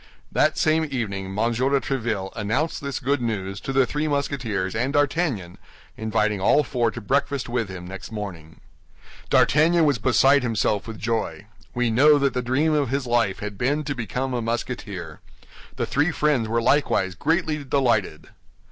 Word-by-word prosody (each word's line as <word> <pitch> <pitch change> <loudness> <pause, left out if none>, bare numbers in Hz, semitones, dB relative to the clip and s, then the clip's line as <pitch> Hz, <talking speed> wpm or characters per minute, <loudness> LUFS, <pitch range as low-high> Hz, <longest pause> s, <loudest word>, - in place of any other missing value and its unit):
That - - +2
same 160 +1 +2
evening 105 -8 -3
M. 95 - -7
de 115 +3 +1 0.3
Tréville 110 -8 -2
announced 120 +9 -1
this 140 -1 -3
good 140 0 0
news 100 -4 -3
to - - -4
the 135 -1 +3
three 150 +5 -2
Musketeers 125 -10 -2
and 125 +5 -1
D'Artagnan, 145 - 0 0.4
inviting 110 -2 0
all 145 +9 +4
four 120 -5 0
to 120 - -7
breakfast 140 +4 -1
with 120 -4 -2
him 90 -2 -7
next 95 +4 -8
morning. 85 -7 -7 0.7
D'Artagnan 165 +3 +4
was 140 -6 +2
beside 135 +4 +4
himself 110 -3 0
with 110 -1 -7
joy. 115 -2 -2 0.3
We 120 -1 +1
know 145 +6 +6
that 140 -2 +1
the 125 - -1
dream 135 +6 +1
of 145 -4 +1
his 135 +1 -1
life 120 -5 +1
had 105 -1 -6
been 145 +5 +1
to 145 -1 -3
become 130 +1 -3
a 120 - -1
Musketeer. 110 -8 -4 0.6
The - - -1
three 145 +4 +1
friends 150 -7 +1
were 115 +1 0
likewise 115 -10 +2
greatly 155 - 0
delighted. 115 - 0
120 Hz, 165 wpm, -24 LUFS, 105-140 Hz, 0.7 s, know